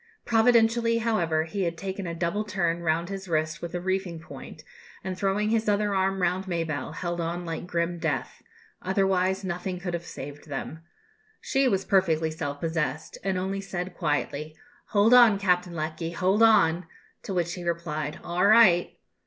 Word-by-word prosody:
Providentially, 230 0 +3
however, 175 -9 +1
he 180 +5 -4
had 170 -2 -1
taken 195 0 -5
a 170 - -4
double 170 +5 -1
turn 175 -5 -1
round 170 +1 0
his 195 -1 -6
wrist 155 +1 -1
with 170 0 -5
a - - -1
reefing 185 -2 -2
point, 160 - -11 0.4
and 185 -1 -3
throwing 200 +3 0
his 225 -1 +1
other 205 0 +1
arm 190 0 0
round 185 +2 0
Mabelle, 160 -5 -3
held 175 0 -3
on 170 +1 -3
like 165 +1 -5
grim 170 0 -1
death; - - -3 0.4
otherwise 190 0 +1
nothing 180 0 -3
could 180 -1 -4
have 170 0 -4
saved 145 +3 -9
them. 145 +2 -5 0.6
She 270 -1 +1
was 195 -5 0
perfectly 165 -5 +2
self 145 -3 -4
possessed, 160 -2 -3
and 190 -1 0
only 190 +2 -2
said 185 -2 -5
quietly, 150 -1 -2 0.3
"Hold 210 +2 +4
on, 240 -5 +7
Captain 180 -3 +1
Lecky, 160 +1 -4
hold 190 +5 +1
on!" 180 -7 +4 0.3
to - - -7
which 175 -2 -1
he 180 - -6
replied, 160 -3 -3
"All 175 +1 -1
right." 205 -6 +5
180 Hz, 170 wpm, -26 LUFS, 165-195 Hz, 0.6 s, on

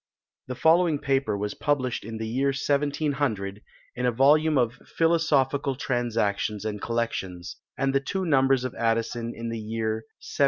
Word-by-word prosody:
The 125 - -4
following 165 +2 +4
paper 135 -6 0
was 105 +1 -3
published 130 -5 -1
in 115 +1 -6
the 110 0 -4
year 130 +5 0
1700, 140 -7 -1 0.3
in 125 - -2
a - - +3
volume 150 +5 +4
of 120 +1 +1 0.2
"Philosophical 145 -5 +2
Transactions 110 -5 -1
and 105 -1 -3
Collections," 95 -7 -3 0.2
and 135 0 +1
the 135 - +4
two 190 +7 -3
numbers 135 -4 +3
of 130 - -3
Addison 115 +1 -1
in 115 0 -5
the 115 0 -4
year 110 0 -3
1710. - - -16
125 Hz, 155 wpm, -26 LUFS, 110-140 Hz, 0.3 s, following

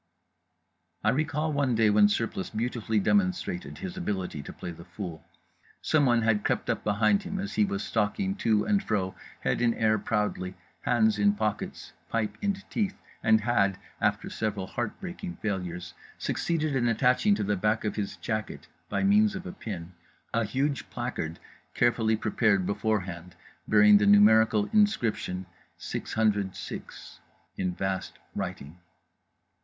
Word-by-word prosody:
I - - +4
recall 150 +2 0
one 140 -4 +1
day 110 -1 +4
when 105 0 +6
Surplice 105 -2 -2
beautifully 110 -1 -1
demonstrated 185 - 0
his 185 -1 -6
ability 95 - -3
to - - -8
play 85 - -7
the 85 0 -11
fool. 90 -2 -7 0.6
Someone 125 -7 +3
had 110 -2 +2
crept - - 0
up - - -3
behind 110 - +3
him 195 0 -5
as 195 +1 -4
he 210 - +3
was 200 +1 -3
stalking 190 - 0
to 110 - +2
and 205 -1 +2
fro, 95 -4 -1 0.3
head - - 0
in 120 -1 +3
air 110 -1 +2
proudly, 105 -3 -1 0.3
hands 110 -3 +2
in 100 0 +4
pockets, 110 0 -3 0.2
pipe 110 -2 -1
in 200 -1 +1 0.2
teeth, 205 -3 -1 0.2
and 110 0 +4
had 100 -4 +2 0.2
(after - - +1
several 105 -3 -2
heart 120 +4 -4
breaking 180 0 -6
failures) 90 -4 -4 0.2
succeeded 155 -4 -1
in 120 -2 +2
attaching 125 - +3
to - - -2
the 105 +1 +1
back 105 +3 0
of 105 - -1
his 105 -2 -3
jacket 110 -2 -4 0.2
by - - 0
means 205 +1 +4
of 190 0 -6
a 180 - -5
pin 95 - -7 0.4
a 115 -1 +2
huge 135 +5 -1
placard 120 -10 -4 0.4
carefully 110 -2 +3
prepared 105 -4 +2
beforehand, 100 -4 -2 0.3
bearing 105 -1 +7
the 105 - +2
numerical 105 +1 +6
inscription 115 - +1 0.3
606 105 -4 -3 0.4
in 90 -1 -2
vast 95 0 -3 0.2
writing. 75 +6 -5
110 Hz, 145 wpm, -28 LUFS, 100-145 Hz, 0.6 s, bearing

